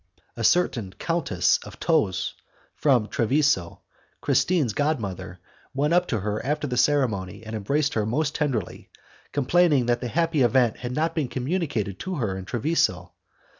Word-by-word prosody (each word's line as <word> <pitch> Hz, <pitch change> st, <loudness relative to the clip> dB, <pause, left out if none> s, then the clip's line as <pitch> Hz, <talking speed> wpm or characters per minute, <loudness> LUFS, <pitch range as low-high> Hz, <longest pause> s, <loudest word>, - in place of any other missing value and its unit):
A 115 Hz, -, -4 dB
certain 115 Hz, -, +2 dB
Countess 145 Hz, -, +1 dB
of -, -, -12 dB
Tos,... 140 Hz, -, +1 dB, 0.4 s
from 125 Hz, -7 st, +2 dB
Treviso, 120 Hz, -, +1 dB, 0.4 s
Christine's 140 Hz, -, +1 dB
god 145 Hz, +4 st, +1 dB
mother, 95 Hz, -3 st, -6 dB, 0.4 s
went 145 Hz, +4 st, +1 dB
up 180 Hz, 0 st, +3 dB
to 115 Hz, -7 st, -1 dB
her 105 Hz, +2 st, -2 dB
after 150 Hz, +3 st, -1 dB
the 125 Hz, -3 st, -3 dB
ceremony, 115 Hz, -9 st, +1 dB
and 110 Hz, +1 st, -6 dB
embraced 140 Hz, +8 st, 0 dB
her 110 Hz, -, 0 dB
most 140 Hz, +8 st, -1 dB
tenderly, 135 Hz, -, -3 dB, 0.4 s
complaining 145 Hz, -1 st, +3 dB
that 120 Hz, 0 st, +1 dB
the 125 Hz, -, -2 dB
happy 165 Hz, +3 st, +1 dB
event 120 Hz, -2 st, +3 dB
had 125 Hz, 0 st, -5 dB
not 160 Hz, +4 st, 0 dB
been 155 Hz, -5 st, -1 dB
communicated 130 Hz, -, -2 dB
to 185 Hz, -1 st, -4 dB
her 110 Hz, -, -2 dB
in 95 Hz, -1 st, -6 dB
Treviso. 105 Hz, -, 0 dB
130 Hz, 155 wpm, -25 LUFS, 105-150 Hz, 0.4 s, up